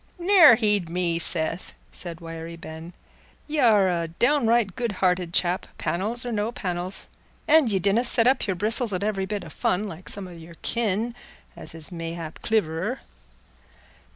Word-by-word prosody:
"Ne'er 350 - +7
heed 210 -6 +1
me, 170 -1 -1
Seth," 165 +1 +2 0.2
said 170 -2 -5
Wiry 165 0 -7
Ben, 165 +1 -10 0.5
"y' 305 0 -2
are 215 -7 +5
a 170 -2 -1
down 240 - +1
right 225 -5 +2
good 235 -3 -2
hearted 180 -2 0
chap, 175 +1 0
panels 220 +8 -1
or 245 - -3
no 215 +1 -1
panels; 180 -3 -3 0.4
an' 310 -3 +5
ye 205 -3 +1
donna 200 +5 +2
set 235 -2 +3
up 260 -2 +2
your 190 - 0
bristles 215 +3 +1
at 185 +1 -2
every 195 -2 -1
bit 205 -2 -4
o' - - -9
fun, 180 +5 -1
like 185 -3 -7
some 200 -2 -3
o' - - -11
your 165 0 -12
kin, 230 +1 -1 0.4
as - - -5
is 160 +2 -5
mayhap 165 -1 -6
cliverer." 210 +3 -1
190 Hz, 170 wpm, -24 LUFS, 170-230 Hz, 0.5 s, Ne'er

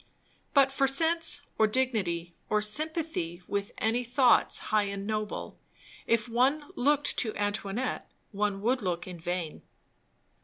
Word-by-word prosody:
But 275 -1 +5
for 275 0 +2
sense, 320 +1 +2 0.2
or 220 - +5
dignity, 205 -9 -1 0.2
or 210 - +3
sympathy 210 - -1
with 200 0 -2
any 230 +3 0
thoughts 245 +1 +3 0.2
high 210 -1 +4
and 200 0 -5
noble, 215 0 -4 0.5
if 230 -1 +2
one 270 +6 +1
looked 290 +3 +2
to 220 -3 -2
Antoinette 205 +4 -2 0.2
one 205 -1 -1
would 250 +4 +1
look 175 -3 -2
in 180 -2 -8
vain. 175 -1 -4
220 Hz, 130 wpm, -29 LUFS, 200-265 Hz, 0.5 s, But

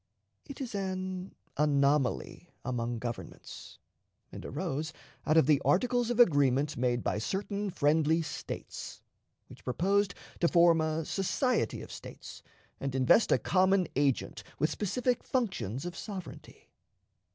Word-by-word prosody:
It 280 - -9
is 250 -5 -5
an 185 -1 -4 0.2
anomaly 145 +2 +1 0.2
among 120 -2 -2
governments, 120 0 -7 0.5
and - - -8
arose 155 +3 -3 0.3
out 155 - +4
of 160 - +6
the 145 -1 +4
articles 245 +4 +2
of 240 0 -1
agreement 145 - +4
made 120 -2 0
by - - 0
certain 200 - -2
friendly 160 0 +2
States, - - -7 0.4
which - - -15
proposed 195 +8 +1 0.2
to 170 - +4
form 170 -1 +5
a 155 0 -1
society 205 - 0
of - - -11
States - - -10 0.4
and 135 -1 -3
invest 130 - +4
a - - +6
common 190 -1 +3
agent 140 -1 0
with 155 +1 +1
specified 245 +6 -1
functions 185 - -2
of 175 -1 -5
sovereignty. 190 -3 -9
165 Hz, 130 wpm, -30 LUFS, 140-195 Hz, 0.5 s, of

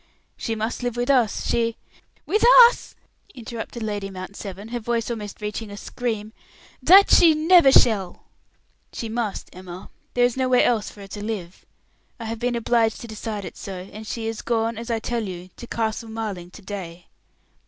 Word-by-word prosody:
"She 225 - -3
must 220 +3 -3
live 245 -1 -3
with 245 +3 +1
us. 245 -6 +2
She 230 -1 0 0.2
" - - -38
"With 425 - +1 0.3
us!" - - -10 0.4
interrupted 235 -1 -6
Lady 205 -2 -3
Mount 185 +1 -8
Severn, 200 +1 -8
her 240 0 -3
voice 235 0 -2
almost 210 -3 -6
reaching 210 +1 -4
a 200 - -8
scream. 220 -2 -4 0.5
"That 380 +9 +7
she 325 -2 +7
never 320 -2 +6
shall." 200 -8 +3 0.7
"She 230 - -5
must, 225 -3 -3
Emma. 180 0 -10 0.2
There 245 0 +5
is 245 - 0
nowhere 255 -1 +3
else 225 -4 +1
for 205 - -14
her 195 - -9
to 205 +1 -7
live. 195 -5 -6 0.5
I 230 - -6
have 225 0 -4
been 245 +1 -1
obliged 230 -1 +1
to 235 - -8
decide 215 -2 -5
it - - -8
so; 185 -1 -7
and 215 +1 -9
she 225 +1 -4
is 225 -1 -3
gone, 230 -1 0
as 230 +2 -7
I 230 - +1
tell 235 +1 -2
you, 180 0 -8
to 240 - -9
Castle 225 0 -2
Marling 210 -6 -5
to - - -14
day." 180 -4 -7
225 Hz, 185 wpm, -23 LUFS, 205-240 Hz, 0.7 s, That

